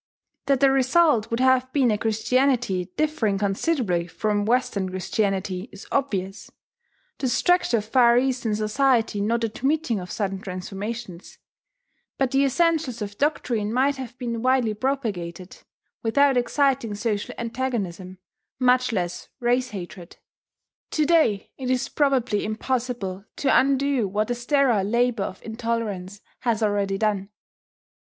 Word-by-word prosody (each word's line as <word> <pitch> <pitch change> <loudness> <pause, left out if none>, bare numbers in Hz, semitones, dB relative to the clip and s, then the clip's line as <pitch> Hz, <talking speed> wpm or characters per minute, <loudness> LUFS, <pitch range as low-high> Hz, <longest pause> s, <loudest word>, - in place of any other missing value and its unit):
That 275 -1 +2
the 275 -1 +6
result 265 -3 +3
would 230 - -1
have 260 0 +3
been 260 -5 +3
a 210 - +1
Christianity 225 -4 +1
differing 300 -10 +1
considerably 200 - 0
from 205 +3 -1
Western 215 -5 0
Christianity 190 +2 -2
is - - -11
obvious, 195 -8 -2 0.7
the 260 - 0
structure 355 -1 +2
of 210 - -3
Far 235 +1 +4
Eastern 245 -4 0
society 225 0 +1
not 230 +3 0
admitting 265 +1 0
of 180 0 -8
sudden 195 -2 -2
transformations; 195 +1 -6 0.8
but 265 -2 +1
the 270 0 +3
essentials 290 -5 +1
of 205 0 -8
doctrine 240 -8 0
might 270 +4 +2
have 250 -2 -8
been 235 -3 -3
widely 255 -3 +2
propagated, 205 -8 -3 0.4
without 275 +4 +3
exciting 250 -3 +1
social 205 -1 -2
antagonism, 210 -7 -3 0.4
much 255 0 +3
less 180 -5 -3
race 250 +1 +1
hatred. 180 -4 -9 0.7
To 310 - +1
day 300 -12 +2
it 255 -1 -3
is 255 -1 0
probably 255 -7 +1
impossible 220 -4 -3
to 275 - +2
undo 275 -3 +2
what 210 +4 -1
the - - +1
sterile 240 -3 +2
labour 235 0 +1
of 185 - -8
intolerance 220 -4 -3 0.2
has 230 -3 0
already 200 -2 0
done. 205 -2 -1
230 Hz, 130 wpm, -24 LUFS, 205-260 Hz, 0.8 s, the